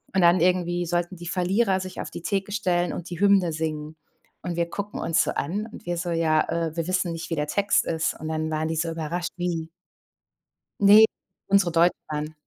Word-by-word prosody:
Und 190 Hz, -, +4 dB
dann 175 Hz, +1 st, +5 dB
irgendwie 175 Hz, 0 st, +1 dB
sollten 175 Hz, +2 st, -2 dB
die 175 Hz, +1 st, -9 dB
Verlierer 190 Hz, +3 st, +1 dB
sich 185 Hz, 0 st, -7 dB
auf -, -, -7 dB
die -, -, -7 dB
Theke 200 Hz, -1 st, -2 dB
stellen 180 Hz, -4 st, 0 dB
und 175 Hz, -, -6 dB
die 175 Hz, -2 st, -6 dB
Hymne 200 Hz, -3 st, +4 dB
singen. 155 Hz, -1 st, -4 dB, 0.5 s
Und 175 Hz, -, -3 dB
wir 170 Hz, 0 st, 0 dB
gucken 200 Hz, +3 st, -5 dB
uns 165 Hz, -, +2 dB
so -, -, -2 dB
an. 200 Hz, +9 st, -3 dB
Und -, -, -12 dB
wir 175 Hz, 0 st, -2 dB
so: 175 Hz, 0 st, -3 dB
„Ja, 160 Hz, -2 st, +2 dB, 0.3 s
äh, 160 Hz, -, -8 dB
wir 165 Hz, 0 st, -1 dB
wissen 185 Hz, -2 st, 0 dB
nicht, 165 Hz, 0 st, -6 dB
wie 165 Hz, -, -1 dB
der 150 Hz, 0 st, -1 dB
Text 200 Hz, +6 st, +2 dB
ist." 165 Hz, 0 st, -1 dB
Und 155 Hz, -, -5 dB
dann 160 Hz, 0 st, -2 dB
waren 155 Hz, 0 st, -1 dB
die 160 Hz, -, -2 dB
so 165 Hz, +1 st, 0 dB
überrascht. 165 Hz, +2 st, -3 dB
Wie 170 Hz, -2 st, -2 dB, 1.1 s
ne, 205 Hz, +2 st, +8 dB, 0.4 s
unsere 195 Hz, -3 st, +4 dB
deutsche 170 Hz, +2 st, +4 dB
dann. 150 Hz, +1 st, -4 dB
175 Hz, 210 wpm, -25 LUFS, 160-185 Hz, 1.1 s, ne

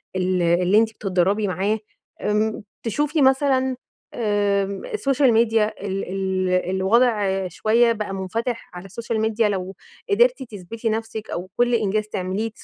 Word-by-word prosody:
ال 185 Hz, -1 st, +1 dB
اللي 175 Hz, +3 st, +3 dB
أنتِ 225 Hz, 0 st, +4 dB
بتتدربي 195 Hz, +1 st, 0 dB
معاها 195 Hz, +4 st, 0 dB, 0.4 s
آمم 215 Hz, +1 st, 0 dB, 0.2 s
تشوفي 295 Hz, +7 st, 0 dB
مثلًا 265 Hz, -1 st, +3 dB, 0.4 s
آمم 200 Hz, -3 st, 0 dB
السوشيال 275 Hz, -, +2 dB
ميديا 220 Hz, -1 st, +3 dB
ال 195 Hz, 0 st, -2 dB
ال 190 Hz, -1 st, -1 dB, 0.2 s
الوضع 195 Hz, 0 st, +2 dB
شويّة 225 Hz, +7 st, +2 dB
بقى 210 Hz, -3 st, -3 dB
مُنفتح 225 Hz, +5 st, -3 dB
على 180 Hz, +1 st, -9 dB
السوشيال 225 Hz, +3 st, -3 dB
ميديا 220 Hz, 0 st, +1 dB
لو 190 Hz, -1 st, -3 dB, 0.3 s
قدرتِ 245 Hz, +5 st, +3 dB
تثبتي 225 Hz, 0 st, -5 dB
نفسك 220 Hz, 0 st, -4 dB
أو 180 Hz, +2 st, -5 dB
كل 240 Hz, 0 st, +3 dB
إنجاز 215 Hz, -1 st, +1 dB
تعمليه 195 Hz, +2 st, -2 dB
تس -, -, -17 dB
215 Hz, 140 wpm, -22 LUFS, 190-230 Hz, 0.4 s, أنتِ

